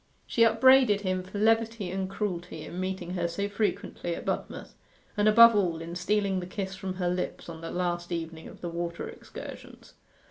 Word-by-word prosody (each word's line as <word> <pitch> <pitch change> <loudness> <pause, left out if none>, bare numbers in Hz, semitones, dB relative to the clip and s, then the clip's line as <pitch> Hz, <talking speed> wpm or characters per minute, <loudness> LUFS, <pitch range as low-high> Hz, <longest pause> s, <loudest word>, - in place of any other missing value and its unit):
She 235 - -1
upbraided 230 -1 +6
him 185 -2 -1
for 185 +3 -8
levity 225 -2 +2
and 190 0 -2
cruelty 180 -6 -4
in 175 - -7
meeting 185 -1 -3
her 175 -2 -1
so 200 +4 -2
frequently 200 -4 -2
at - - -8
Budmouth, - - -4 0.4
and 210 0 +2
above 230 +1 +8
all 175 -5 +1
in 165 +1 -7
stealing 195 +2 0
the 180 - -6
kiss 190 0 -4
from 190 -1 -5
her 180 -1 -1
lips 180 +1 -3
on 165 -1 -8
the 165 - -5
last 175 -1 -2
evening 165 -1 -4
of - - -13
the 175 - -3
water 170 0 -4
excursions. - - -10
185 Hz, 185 wpm, -28 LUFS, 175-210 Hz, 0.4 s, above